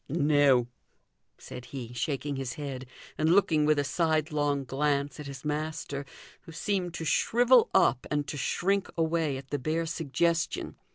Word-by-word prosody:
"No!" 145 Hz, -5 st, +3 dB, 0.7 s
said 125 Hz, -, -9 dB
he, 125 Hz, -2 st, -7 dB
shaking 140 Hz, +4 st, -2 dB
his 135 Hz, -2 st, -4 dB
head, 135 Hz, -3 st, -6 dB, 0.3 s
and 155 Hz, +1 st, +2 dB
looking 160 Hz, -6 st, +3 dB
with 155 Hz, 0 st, +3 dB
a 145 Hz, -, +2 dB
sidelong 150 Hz, -2 st, 0 dB
glance 140 Hz, +1 st, -1 dB
at 150 Hz, -, -7 dB
his 140 Hz, +1 st, -9 dB
master, 150 Hz, -2 st, -3 dB, 0.4 s
who -, -, -13 dB
seemed 180 Hz, 0 st, -2 dB
to 165 Hz, -, -4 dB
shrivel 240 Hz, +7 st, +4 dB
up 125 Hz, +2 st, +3 dB
and 145 Hz, -1 st, 0 dB
to -, -, -4 dB
shrink 195 Hz, +6 st, 0 dB
away 160 Hz, -3 st, 0 dB
at 135 Hz, 0 st, -11 dB
the 145 Hz, -, -1 dB
bare 160 Hz, +5 st, -1 dB
suggestion. 165 Hz, +2 st, -1 dB
150 Hz, 155 wpm, -28 LUFS, 140-165 Hz, 0.7 s, shrivel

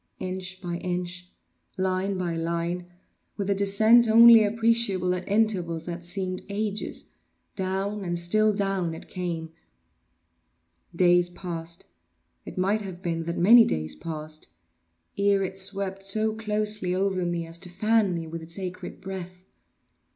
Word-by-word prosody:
Inch 185 Hz, 0 st, -5 dB
by 175 Hz, -1 st, -3 dB
inch—line 180 Hz, -, -4 dB
by 175 Hz, -2 st, -2 dB
line—with 175 Hz, +4 st, -5 dB
a -, -, +5 dB
descent 215 Hz, +4 st, +5 dB
only 230 Hz, 0 st, +8 dB
appreciable 215 Hz, -4 st, +2 dB
at 180 Hz, +1 st, -5 dB
intervals 185 Hz, -6 st, +1 dB
that 175 Hz, 0 st, -6 dB
seemed 185 Hz, +1 st, -2 dB
ages—down 200 Hz, -1 st, -4 dB
and 175 Hz, -1 st, -2 dB
still 215 Hz, +6 st, +3 dB
down 195 Hz, -5 st, -1 dB
it -, -, -11 dB
came! 170 Hz, -3 st, -4 dB, 1.4 s
Days 175 Hz, 0 st, +4 dB
passed—it 165 Hz, -, -9 dB
might 200 Hz, +4 st, +1 dB
have 190 Hz, -2 st, -8 dB
been 165 Hz, -2 st, -2 dB
that 170 Hz, +1 st, -3 dB
many 230 Hz, +7 st, +8 dB
days 80 Hz, -, -1 dB
passed—ere 150 Hz, -, -4 dB
it 190 Hz, 0 st, -4 dB
swept 195 Hz, 0 st, -1 dB
so 215 Hz, +3 st, 0 dB
closely 210 Hz, -3 st, -1 dB
over 190 Hz, -1 st, 0 dB
me 175 Hz, -1 st, -2 dB
as 165 Hz, +1 st, -8 dB
to 180 Hz, 0 st, -7 dB
fan 210 Hz, +1 st, +2 dB
me 165 Hz, -1 st, -4 dB
with 165 Hz, +1 st, -7 dB
its 165 Hz, +2 st, -5 dB
acrid 185 Hz, -1 st, -6 dB
breath. 185 Hz, -1 st, -7 dB
185 Hz, 125 wpm, -26 LUFS, 170-200 Hz, 1.4 s, only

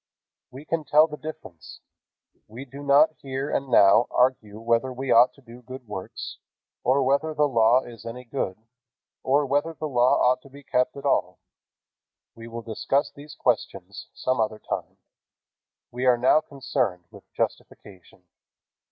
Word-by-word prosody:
We 130 Hz, +3 st, -12 dB
can 165 Hz, -1 st, -2 dB
tell 150 Hz, +2 st, +5 dB
the 150 Hz, -2 st, -7 dB
difference. 150 Hz, -, -10 dB, 0.7 s
We 120 Hz, +5 st, -9 dB
do 140 Hz, +2 st, -11 dB
not 145 Hz, +2 st, +5 dB
here 135 Hz, +1 st, -4 dB
and 135 Hz, -1 st, -2 dB
now 100 Hz, 0 st, +6 dB
argue 115 Hz, -5 st, 0 dB
whether 115 Hz, +3 st, 0 dB
we 130 Hz, +1 st, -4 dB
ought 120 Hz, +2 st, +6 dB
to 140 Hz, -, -20 dB
do 120 Hz, 0 st, -13 dB
good 130 Hz, 0 st, -11 dB
works, 95 Hz, -3 st, -7 dB, 0.4 s
or 130 Hz, +3 st, +3 dB
whether 140 Hz, +4 st, +1 dB
the 150 Hz, 0 st, +3 dB
Law 120 Hz, 0 st, +3 dB
is 115 Hz, -2 st, -12 dB
any 115 Hz, +2 st, -7 dB
good, 115 Hz, -7 st, -4 dB, 0.6 s
or 140 Hz, +2 st, +2 dB
whether 145 Hz, +4 st, -1 dB
the 155 Hz, -, -4 dB
Law 125 Hz, -3 st, +3 dB
ought 125 Hz, 0 st, +2 dB
to 140 Hz, -, -16 dB
be 140 Hz, +1 st, -14 dB
kept 125 Hz, +3 st, 0 dB
at 140 Hz, -, -9 dB
all. 140 Hz, -, +1 dB, 1.0 s
We 115 Hz, 0 st, -11 dB
will 115 Hz, 0 st, -7 dB
discuss 125 Hz, +5 st, -1 dB
these 150 Hz, +2 st, -12 dB
questions 100 Hz, -8 st, -2 dB
some 130 Hz, -1 st, -1 dB
other 110 Hz, 0 st, -1 dB
time. -, -, -6 dB, 0.9 s
We 125 Hz, +2 st, -2 dB
are 125 Hz, -1 st, +5 dB
now 130 Hz, +5 st, +4 dB
concerned 130 Hz, -, -3 dB
with -, -, -16 dB
justification. 95 Hz, -4 st, -6 dB
130 Hz, 160 wpm, -25 LUFS, 115-140 Hz, 1.0 s, now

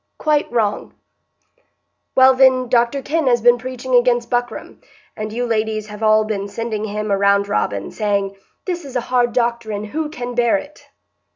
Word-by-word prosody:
"Quite 300 Hz, -1 st, 0 dB
wrong." 215 Hz, -4 st, -1 dB, 1.2 s
"Well, 260 Hz, 0 st, +7 dB
then, 255 Hz, -1 st, +4 dB
Dr 240 Hz, +3 st, +1 dB
Kenn 315 Hz, 0 st, -1 dB
has 240 Hz, -1 st, +3 dB
been 240 Hz, +1 st, +4 dB
preaching 255 Hz, +1 st, -6 dB
against 240 Hz, -1 st, +3 dB
buckram, 245 Hz, 0 st, -3 dB, 0.3 s
and 215 Hz, 0 st, -5 dB
you 245 Hz, +3 st, -2 dB
ladies 215 Hz, -2 st, -2 dB
have 210 Hz, +1 st, -9 dB
all 215 Hz, 0 st, +4 dB
been 205 Hz, -2 st, -3 dB
sending 220 Hz, +1 st, -4 dB
him 210 Hz, 0 st, -4 dB
a -, -, +4 dB
roundrobin, 200 Hz, -, +1 dB
saying, 200 Hz, -2 st, -1 dB, 0.3 s
'This 355 Hz, -2 st, -3 dB
is 270 Hz, -2 st, -10 dB
a 245 Hz, -, +1 dB
hard 240 Hz, -1 st, +3 dB
doctrine; 235 Hz, -3 st, -1 dB
who 300 Hz, +8 st, -4 dB
can 245 Hz, -5 st, -6 dB
bear 240 Hz, +4 st, +2 dB
it? 290 Hz, +1 st, -11 dB
235 Hz, 165 wpm, -19 LUFS, 215-255 Hz, 1.2 s, Well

